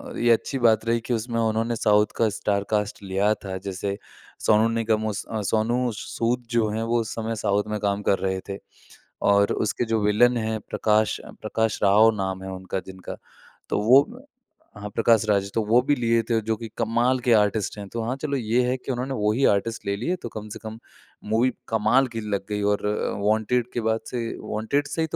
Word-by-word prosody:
अ, - - -6
ये 120 0 +4
अच्छी 130 +4 +1
बात 110 -2 +3
रही 115 0 +1
कि 120 - -1
उसमें 115 +1 -2
उन्होंने 115 +1 0
साउथ 105 -1 +4
का 115 -2 +3
स्टार 100 -1 0
कास्ट 105 0 -1
लिया 100 +2 +1
था 95 -1 -4
जैसे 100 +1 -3 0.5
सोनू 110 +1 +5
निगम 110 -1 0
उस 105 -1 -3 0.3
सोनू 120 +3 +1
सूद 120 +3 -2
जो 115 -2 +2
हैं 110 +2 -2
वो 115 +1 +1
उस 110 - -5
समय 115 0 -3
साउथ 100 -1 +1
में 105 0 -3
काम 100 0 -1
कर 100 - +3
रहे 95 0 -1
थे 100 - -4 0.7
और 100 0 +4
उसके 110 +2 -1
जो 110 -1 0
विलन 120 +4 +4
हैं 110 -1 -2
प्रकाश 110 0 +1 0.2
प्रकाश 110 0 -1
राव 105 +3 +6
नाम 95 -1 -3
है 95 - -6
उनका 95 0 -4
जिनका 95 -1 -8 0.5
तो - - 0
वो 130 +6 +7 0.7
हाँ 105 0 -6
प्रकाश 115 -1 +4
राज 100 -1 +1
तो 115 - +1
वो 115 +4 +4
भी 145 +2 +1
लिए 115 -1 +2
थे 115 - +3
जो 110 - +2
कि 115 - -7
कमाल 120 +3 +1
के 120 -1 +2
आर्टिस्ट 105 -1 +1
हैं। 100 -1 -7
तो 115 - -2
हाँ 125 +3 -2
चलो 145 -2 -1
ये 120 0 +1
है 125 - +1
कि 130 +1 -5
उन्होंने 130 +2 -3
वही 105 +6 +2
आर्टिस्ट 115 +3 -3
ले 100 0 0
लिए 170 - -1
तो 120 - -4
कम 110 0 -6
से 110 - -8
कम 110 +1 -7 0.5
मूवी 120 +3 +3 0.2
कमाल 115 +4 +3
की 115 - -2
लग 100 -1 -2
गई 105 0 -2
और 105 - -3 0.4
वांटेड 110 +3 +1
के 120 - -1
बाद 110 0 +1
से 120 -2 -2 0.3
वांटेड 140 +7 0
से 160 +3 -3
ही 160 - +1
110 Hz, 210 wpm, -24 LUFS, 105-120 Hz, 0.7 s, वो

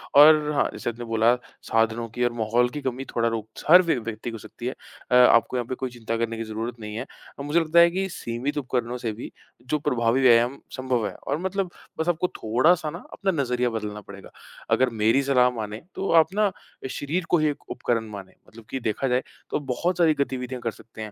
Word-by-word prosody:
और 150 +1 +7
हाँ, 140 - +2
जैसे - - -3
आपने 120 +1 -6
बोला 115 +1 +3 0.3
साधनों 115 +1 +1
की 125 +3 -2
और 120 - +2
माहौल 120 +2 +1
की 145 +3 -6
कमी 130 0 -3
थोड़ा 115 0 +2
रोक 110 -2 -4 0.2
हर 180 +3 +10
व्य 170 -2 +1
व्यक्ति 115 0 -5
को - - -7
हो - - -7
सकती 120 - -10
है। 130 - -2 0.4
अ, 125 - +5
आपको 125 0 +5
यहाँ 120 - -1
पे 130 - -3
कोई 130 0 -4
चिंता 115 -2 -4
करने 115 0 -2
की 115 - -3
ज़रूरत 115 +2 -5
नहीं 105 -1 -7
है। 115 - -4 0.3
अ, - - -4
मुझे 145 +4 +2
लगता 165 +1 +3
है 170 0 +8
कि 190 +2 -1
सीमित 125 0 -4
उपकरणों 125 -3 -2
से 120 -2 -3
भी 115 - -8 0.3
जो 135 +5 -2
प्रभावी 125 -3 +1
व्यायाम 120 +1 +4 0.2
संभव 130 -4 -1
है - - -6
और 140 - 0
मतलब 190 +1 -2 0.3
बस 160 +2 0
आपको 175 +2 +1
थोड़ा-सा 155 +9 +2
ना 170 +3 -8
अपना 195 -1 0
नज़रिया 125 -1 0
बदलना 105 -2 -5
पड़ेगा। 100 -1 -12 0.4
अगर 130 0 +4
मेरी 115 +6 +4
सलाह 125 -2 +4
मानें, 105 -1 -5
तो 195 - -3
आप 165 +2 +5
ना 210 -1 +2 0.4
शरीर 165 +7 -2
को 175 - +4
ही 155 - +2
एक 145 - -7
उपकरण 115 -2 -1
मानें 100 -2 -9
मतलब 110 0 -15
कि 135 - -3
देखा 115 +3 -1
जाए, 125 0 +1 0.3
तो - - -1
बहुत 145 +7 -1
सारी 165 -3 +4
गतिविधियाँ 130 -2 -5
कर 115 -1 -1
सकते 110 +1 -13
हैं। 110 -1 -6
125 Hz, 225 wpm, -25 LUFS, 115-150 Hz, 0.4 s, हर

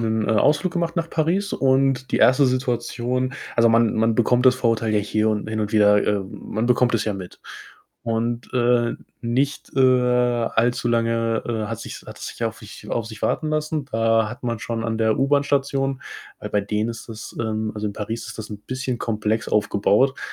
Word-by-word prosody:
'nen, 110 -1 0
äh, - - +3
Ausflug 150 - +2
gemacht 170 -1 -2
nach 165 0 -1
Paris 175 +5 0
und 135 -1 +2
die - - +1
1. 130 +1 +5
Situation 125 0 -1 0.2
also, 115 0 +5
man 115 -1 +3
man 110 0 +2
bekommt 125 +2 +3
das 130 - +7
Vorurteil 115 -3 0
ja 105 - +3
hier 110 +1 0
und 105 0 -1
hin 110 0 -2
und 105 0 -2
wieder 105 -1 +5
äh, 105 -1 +1
man 110 +4 -4
bekommt 125 -1 +3
es 110 - +1
ja 105 - -1
mit 95 -2 -9 0.6
und, 115 +1 -2
äh, 120 -1 +2 0.3
nicht, 130 +5 -1
äh, - - +3
allzu 125 -2 +2
lange, 115 -1 +1
äh, 110 -3 -2
hat 115 -2 -4
sich's - - -8
hat - - -10
es - - -6
sich - - -8
auf 115 0 -3
sich 105 -2 -12
auf 115 -2 -1
sich 110 -2 -10
warten 155 - 0
lassen. 155 -1 -1
Da 115 -1 +2
hat 120 +4 -9
man 115 -2 -2
schon 115 0 -4
an 110 -1 -2
der 110 -1 +2
U-Bahn-Station, 135 -1 +1 0.4
weil - - -6
bei 105 - +2
denen 105 +3 -1
ist 115 0 -9
das 110 -1 -9
ähm, 110 -1 -2
also, 105 0 -3
in 100 - -3
Paris 110 +2 -5
ist - - -9
das 110 - -7
'n 105 - -6
bisschen 130 -2 -3
komplex 110 0 -1
aufgebaut. 105 +5 +2
115 Hz, 200 wpm, -22 LUFS, 110-130 Hz, 0.6 s, das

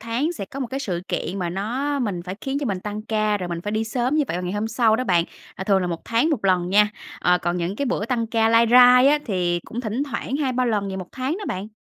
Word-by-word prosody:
tháng 235 +9 -1
sẽ 260 - -5
có 275 +8 -8
1 260 - -1
cái 265 +4 -4
sự 180 -9 -3
kiện 185 +4 -3
mà 175 -2 -2
nó 250 +10 -2
mình 200 -9 -2
phải 180 +1 -6
khiến 270 +1 -2
cho 285 - -2
mình 195 -4 -2
tăng 210 +2 -5
ca, 215 -1 0
rồi 180 -2 -4
mình 170 -1 -4
phải 205 - -4
đi 220 +1 0
sớm 245 +5 -1
như 305 - +3
vậy - - -2
vào 180 - -3
ngày 180 0 -3
hôm 210 +2 -2
sau 225 -1 +3
đó 255 - -2
bạn, 175 -6 +3 0.3
là 190 - -5
thường 195 -1 +3
là 180 - -1
1 170 -1 -5
tháng 235 +8 +1
1 260 -10 -1
lần 180 -2 +2
nha, 210 +2 +4 0.3
ờ, 180 0 +3
còn 175 0 -1
những 175 +3 -2
cái 280 - -1
bữa 230 -4 -1
tăng 235 -2 -1
ca 225 0 +2
lai 230 +1 +5
rai 250 +1 +8
á 295 +1 +4
thì 175 -5 0
cũng 235 - -5
thỉnh 235 +2 -2
thoảng 270 0 -3
2-3 255 -4 0
lần 205 -4 0
gì 190 - -4
1 185 -2 -6
tháng 265 +5 -2
đó 420 - -6
bạn. 190 +3 -4
220 Hz, 295 wpm, -23 LUFS, 190-250 Hz, 0.3 s, rai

